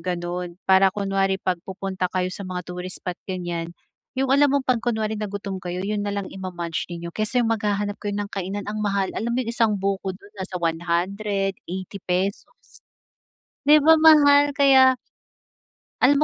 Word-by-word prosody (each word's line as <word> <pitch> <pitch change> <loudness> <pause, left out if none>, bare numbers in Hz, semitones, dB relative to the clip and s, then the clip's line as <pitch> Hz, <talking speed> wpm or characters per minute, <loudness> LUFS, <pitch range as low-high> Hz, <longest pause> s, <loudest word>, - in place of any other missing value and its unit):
gano'n, 175 0 -4
para 190 0 +5
kunwari 195 -1 +1
'pag 185 -2 -2
pupunta 190 -1 -3
kayo 185 0 -2
sa - - -8
mga 185 -2 -5
tourist 180 +1 -7
spot, 180 -1 -4
ganyan. 175 -3 -3 0.5
Yung 265 0 0
alam 280 +2 +5
mong 280 -1 +2
'pag 255 -2 +3
kunwari 220 -3 -1
na 210 - -2
gutom 200 -1 -5
kayo, 180 +1 -4
'yun 210 +1 -2
na 205 - -2
lang 200 -1 -3
ima-munch 175 -3 -4
ninyo 170 -1 -7
kesa 225 +3 0
yung 225 - 0
maghahanap 205 -1 -2
kayo 205 -1 -2
ng 205 0 -3
kainan, 195 +1 -4
ang 215 +1 -4
mahal. 200 -2 0
Alam 235 - -2
mo - - 0
yung 230 - -4
isang 225 -3 +2
buko 195 -1 -2
dun, 200 +2 -16
nasa 190 0 -6
100, 185 +4 -1
₱80. 190 +1 -3 1.2
'Di 300 - +8
ba 320 - +8
mahal? 290 -3 +7
Kaya 265 -2 +6 1.1
Alam 285 +3 +5
195 Hz, 170 wpm, -23 LUFS, 180-215 Hz, 1.2 s, Di